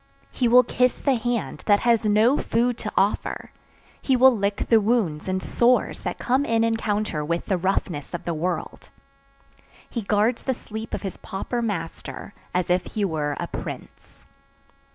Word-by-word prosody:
He 250 - +1
will 250 +2 +7
kiss 250 +1 +1
the 275 - +2
hand 240 -1 -2
that 205 -1 +4
has 230 -3 +3
no 215 +6 +4
food 240 +2 +1
to 210 - -4
offer, 195 +2 0 0.5
he 265 - +2
will 255 0 +6
lick 200 -1 -1
the 225 -2 +5
wounds 200 -9 0
and 185 0 -1
sores 245 +1 +2
that - - -4
come 260 +3 +1
in 225 -4 +1
encounter 215 -7 -1
with 170 +3 -2
the 195 - +1
roughness 180 -4 -2
of - - -7
the 170 - -1
world. 170 +3 -4 1.0
He 235 - -4
guards 215 +3 +1
the 260 - -1
sleep 220 0 -6
of - - -7
his 195 - -5
pauper 235 +5 -4
master 200 -2 -5 0.2
as 180 0 0
if 180 0 +2
he 210 -2 0
were 150 -5 -2
a - - -2
prince. - - -9
215 Hz, 170 wpm, -24 LUFS, 185-240 Hz, 1.0 s, will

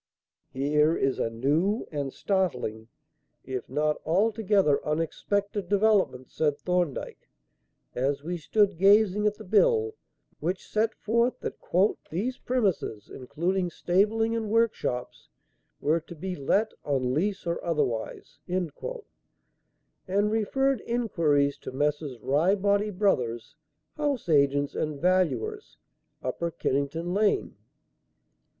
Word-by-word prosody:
"Here 150 +4 +2
is 135 -1 0
a - - 0
new 150 - 0
and 140 -3 -3
startling, 125 - -1 0.6
if 130 -2 -5
not 150 +3 0
altogether 195 -3 +2
unexpected, 195 +5 -2
development," 200 -11 +2
said 150 -2 0
Thorndyke, 175 -2 -2 0.6
as 140 +3 -1
we 175 +3 -3
stood 200 +1 +1
gazing 205 +1 +5
at 210 - 0
the - - -11
bill; 440 - +3 0.5
which 180 +4 -3
set 220 +1 0
forth 235 +3 +1
that - - -5 0.5
"these 225 +11 -2
premises, 195 - -1
including 175 +8 -1
stabling 215 +7 +1
and 220 -2 -2
workshops," 215 - -1 0.5
were 155 +3 +2
"to 170 +2 -12
be 185 +3 -4
let 200 +10 +1
on 130 -3 0
lease 195 +7 -1
or 170 0 -2
otherwise," 150 -9 -2
and 180 -3 -1 1.6
referred 265 +3 +1
inquiries 165 -12 +1
to - - -7
Messrs. 145 0 -1
Ryebody 200 - +2
Brothers, 130 - 0 0.4
house 285 - -1
agents 140 -1 +3
and 150 -2 -3
valuers, 185 - 0 0.5
Upper 170 - -2
Kennington 160 +3 -2
Lane. 205 +1 +1
175 Hz, 110 wpm, -27 LUFS, 145-210 Hz, 1.6 s, gazing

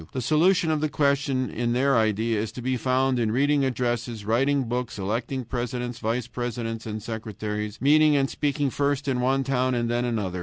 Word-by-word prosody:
The 130 - -2
solution 160 +6 +3
of 155 -1 0
the 155 - 0
question 140 -4 +1
in 120 +1 -1
their 135 +2 +2
idea 110 0 +1
is 110 -1 -4
to 125 - -7
be 130 +1 0
found 130 +1 +1
in 110 -2 +1
reading 140 +4 +2
addresses, 120 -3 -2
writing 135 +5 +2
books, 125 0 -3
electing 115 +6 -2
presidents, 120 0 -4
vice 115 +2 -1
presidents, 115 -2 -4
and 110 -1 -5
secretaries, 105 -2 -4
and - - -12
meeting 150 +1 +5
and 135 -1 +2
speaking 145 -1 -1
first 140 0 -1
in 130 -2 0
one 135 +2 +2
town 130 -1 0
and 120 -1 0
then 120 0 0
in 120 -2 -1
another. 95 -3 -3
125 Hz, 200 wpm, -25 LUFS, 115-135 Hz, -, meeting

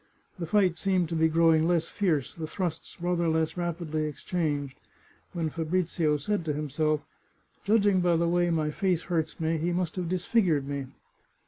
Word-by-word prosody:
The 170 - -3
fight 185 -2 +2
seemed 185 -4 +1
to 170 - -2
be 160 0 +4
growing 160 0 +4
less 170 -2 +2
fierce, 155 -9 0
the 160 -2 -5
thrusts 175 -2 -4
rather 175 -1 0
less 160 -1 +1
rapidly 170 -3 -2
exchanged, 145 -3 -3 0.5
when 165 -3 -2
Fabrizio 165 -1 0
said 200 +6 -1
to 150 - 0
him 150 -1 -4
self, 155 +1 +1 0.3
" - - -39
Judging 205 -3 +3
by 175 -1 +3
the 170 +1 +2
way 175 0 +2
my 155 -2 0
face 180 0 0
hurts 160 -2 -2
me 160 0 0
he 170 +3 0
must 175 0 -2
have 175 -2 -2
disfigured 180 - +1
me." 140 -2 -3
165 Hz, 180 wpm, -28 LUFS, 155-180 Hz, 0.5 s, be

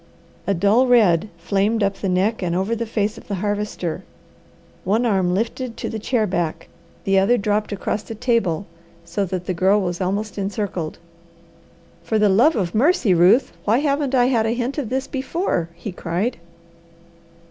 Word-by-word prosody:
A 200 - +2
dull 205 +8 +3
red 210 -6 +4
flamed 200 +5 0
up 195 0 0
the 195 - -2
neck 195 +5 +1
and 175 -2 -1
over 190 +5 0
the 230 0 -3
face 215 -1 -1
of - - -18
the 200 - -2
Harvester. 205 -3 -3 0.8
One 220 +6 +1
arm 190 -5 +2
lifted 230 +3 -3
to - - -4
the 220 - -4
chair 220 0 0
back, 175 -5 -3 0.3
the 195 0 +3
other 235 +6 +3
dropped 210 0 -1
across 205 +1 -2
the 225 - -8
table 215 -7 0 0.4
so 185 +4 -2
that 180 -1 -4
the 185 - -1
Girl 190 +4 +3
was 175 -2 -3
almost 200 +3 -2
encircled. 195 -5 -3 1.0
"For 170 +6 -1
the 210 -1 +4
love 240 +12 +4
of 180 -5 -1
mercy, 240 - +3
Ruth, 190 +10 +4
why 220 +3 +3
haven't 280 -1 0
I 245 -1 +4
had 235 -4 +2
a 230 - 0
hint 250 +4 -2
of 255 -7 -3
this 265 +1 -1
before?" 270 - -2
he 190 +4 -6
cried. 180 +7 -2
210 Hz, 175 wpm, -21 LUFS, 185-235 Hz, 1.0 s, red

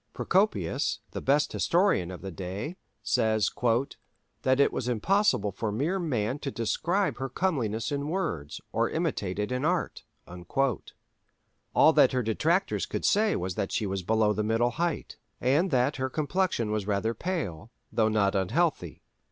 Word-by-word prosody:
Procopius, 185 - +1
the - - -5
best 145 +2 +2
historian 175 - +2
of 90 0 -8
the 95 - -5
day, 95 - -5 0.3
says 110 -2 +2 0.9
"that 130 +1 +2
it 140 - +4
was 125 - -3
impossible 125 - +2
for 105 +2 -3
mere 150 - 0
man 130 - -1
to 140 - -3
describe 165 - -1
her 135 0 -3
comeliness 125 - -1
in 145 0 -2
words, 150 - -3
or - - +1
imitate 95 -1 -2
it 105 +3 -2
in 125 +2 -1
art." 175 +1 -1 1.7
All - - +6
that - - +5
her 125 -1 +1
detractors 160 - 0
could - - -3
say 210 +1 +3
was 90 +1 -2
that 95 - -3
she 110 - 0
was 95 -1 -2
below 110 +3 +2
the 105 +1 -1
middle 115 +3 +1
height, 170 +4 -3 0.2
and 145 +9 +2
that 130 0 +1
her 130 0 -1
complexion 155 - 0
was 105 -2 -2
rather 105 +2 0
pale, 115 - -4 0.2
though 110 -1 +2
not 100 -2 +2
unhealthy. 95 -2 0
120 Hz, 155 wpm, -28 LUFS, 105-160 Hz, 1.7 s, All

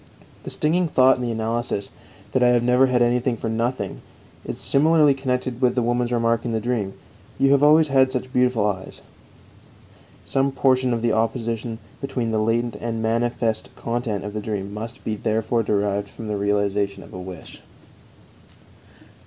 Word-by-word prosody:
The - - -7
stinging 170 +4 +1
thought 130 -3 +4
in - - -5
the 120 - -2
analysis, 115 -2 -2 0.4
that 130 - +1
I 125 - +5
have 120 -1 +3
never 125 +2 +4
had 125 -1 +3
anything 120 0 +1
for 115 - -3
nothing, 115 -2 -2 0.4
is - - -5
similarly 150 0 +4
connected 130 -2 -2
with 125 -1 +3
the 125 - +1
woman's 120 +1 0
remark 115 -1 +1
in 120 - -3
the 110 - +1
dream: 110 -4 -2 0.4
"You 135 0 +3
have 140 0 +4
always 155 +1 +5
had 130 -1 +4
such 130 0 -4
beautiful 125 -4 +2
eyes." 95 -3 -4 1.2
Some 135 0 0
portion 130 -2 +2
of 115 -1 -1
the 115 - +2
opposition 115 0 -1 0.2
between 125 -4 -2
the 110 - +1
latent 115 +2 0
and 115 -1 -3
manifest 115 -1 0
content 115 -4 -3
of 105 - -5
the 105 - -3
dream 100 -2 -4
must 115 +2 -7
be 110 - -2
therefore 110 +2 0
derived 100 -1 -1
from 115 - -9
the 105 - -2
realization 100 0 0
of - - -15
a 90 - -6
wish. 90 -2 -10
115 Hz, 170 wpm, -23 LUFS, 110-125 Hz, 1.2 s, I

